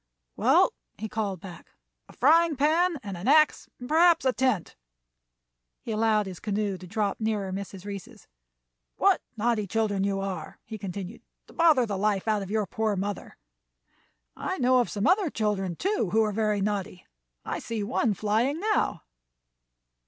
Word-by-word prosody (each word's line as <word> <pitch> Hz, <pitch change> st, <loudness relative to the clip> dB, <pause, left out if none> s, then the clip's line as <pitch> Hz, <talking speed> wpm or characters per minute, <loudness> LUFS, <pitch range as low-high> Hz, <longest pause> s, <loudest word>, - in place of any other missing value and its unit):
"Well," -, -, +4 dB, 0.2 s
he 220 Hz, -, -4 dB
called 205 Hz, -5 st, -3 dB
back, 180 Hz, -4 st, -11 dB, 0.4 s
"a -, -, -14 dB
frying 320 Hz, +4 st, +4 dB
pan 320 Hz, +5 st, +2 dB
and 200 Hz, -2 st, -5 dB
an 175 Hz, +5 st, -6 dB
axe, 305 Hz, +2 st, +4 dB
and 245 Hz, -, -8 dB
perhaps 330 Hz, +1 st, +4 dB
a 260 Hz, -, +3 dB
tent." 250 Hz, -10 st, 0 dB, 1.1 s
He -, -, -5 dB
allowed 215 Hz, -1 st, +2 dB
his 185 Hz, -2 st, -8 dB
canoe 205 Hz, -2 st, -2 dB
to 185 Hz, -, -10 dB
drop 205 Hz, +1 st, -1 dB
nearer 215 Hz, -3 st, -1 dB
Mrs. 195 Hz, 0 st, -6 dB
Reece's. 200 Hz, -3 st, -8 dB, 0.7 s
"What -, -, +3 dB, 0.2 s
naughty 220 Hz, -2 st, 0 dB
children 205 Hz, -1 st, 0 dB
you 195 Hz, 0 st, 0 dB
are," 195 Hz, -1 st, -5 dB
he 220 Hz, -1 st, -7 dB
continued, 195 Hz, +3 st, -6 dB, 0.2 s
"to -, -, -17 dB
bother 315 Hz, -7 st, +4 dB
the 200 Hz, -3 st, -3 dB
life 205 Hz, 0 st, 0 dB
out 215 Hz, -2 st, +1 dB
of 195 Hz, -, -6 dB
your 215 Hz, 0 st, 0 dB
poor 220 Hz, -1 st, -1 dB
mother! 200 Hz, +1 st, -5 dB, 1.0 s
I -, -, -3 dB
know 255 Hz, 0 st, +4 dB
of 245 Hz, -, +1 dB
some 205 Hz, 0 st, -2 dB
other 370 Hz, -1 st, +3 dB
children, 200 Hz, -7 st, -1 dB
too, 385 Hz, -, -1 dB
who 220 Hz, +1 st, +4 dB
are 215 Hz, -, 0 dB
very 210 Hz, -1 st, 0 dB
naughty. 200 Hz, -2 st, -3 dB, 0.4 s
I -, -, -3 dB
see 225 Hz, -2 st, -4 dB
one 215 Hz, 0 st, 0 dB
flying 225 Hz, -, 0 dB
now." 425 Hz, +2 st, 0 dB
215 Hz, 165 wpm, -27 LUFS, 195-250 Hz, 1.1 s, Well